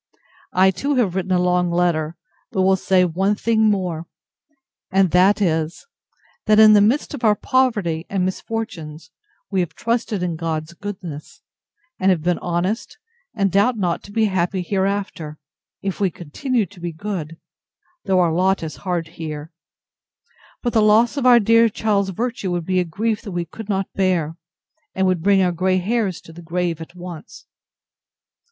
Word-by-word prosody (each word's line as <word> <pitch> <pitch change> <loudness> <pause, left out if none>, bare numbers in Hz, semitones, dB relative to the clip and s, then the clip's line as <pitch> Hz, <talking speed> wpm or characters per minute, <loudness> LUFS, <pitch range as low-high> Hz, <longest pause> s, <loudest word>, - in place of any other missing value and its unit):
I, 190 +1 +5
too, 280 +9 -1
have 225 -8 +1
written 190 0 -2
a 185 - +4
long 180 0 +2
letter, 170 -2 0 0.3
but 190 -4 +1
will 190 0 +4
say 185 -1 +2
one 190 +4 +1
thing 220 0 +2
more; 180 -5 -2 0.8
and 190 -2 +3
that 195 +3 +4
is, 160 -2 -1 0.6
that, 215 0 +5
in 215 0 +8
the 205 - +6
midst 235 +10 +1
of 270 -4 -7
our 215 -2 +5
poverty 210 - 0
and 190 -2 0
misfortunes, 170 -6 -5 0.4
we 190 - +1
have 175 -2 -2
trusted 230 -4 -1
in 170 -2 -2
God's 160 0 -3
goodness, 185 - -8 0.6
and 185 -2 +3
been 175 0 +1
honest, 180 +6 -2 0.4
and 195 -2 +1
doubt 205 +6 +3
not 180 -4 -1
to 205 - -12
be 220 +1 +2
happy 185 -1 0
hereafter, 190 -5 -2 0.5
if 195 -2 -3
we 195 -2 +2
continue 215 - -2
to 190 0 -16
be 175 0 -4
good, 165 -2 -5 0.7
though 190 -2 +3
our 170 -2 +2
lot 190 +1 +1
is 160 - -6
hard 175 -4 -2
here; 155 -1 -7 1.1
but 240 - -1
the 220 - +4
loss 220 +4 +4
of 270 -3 +1
our 245 -1 +8
dear 230 +1 +4
child's 205 -2 0
virtue 225 0 -3
would 175 -2 -2
be 185 +1 +1
a - - +2
grief 215 +6 -2
that 200 -5 -8
we 175 -1 -2
could 215 +5 -10
not 195 -1 0
bear, 175 -5 0 0.6
and 190 - +1
would 185 -3 +1
bring 195 +1 +4
our 180 - +2
grey 185 +2 +1
hairs 200 0 -1
to 165 - -14
the 170 - -11
grave 170 -1 -2
at 165 +2 -10
once. 175 +2 -10
185 Hz, 170 wpm, -21 LUFS, 170-210 Hz, 1.1 s, in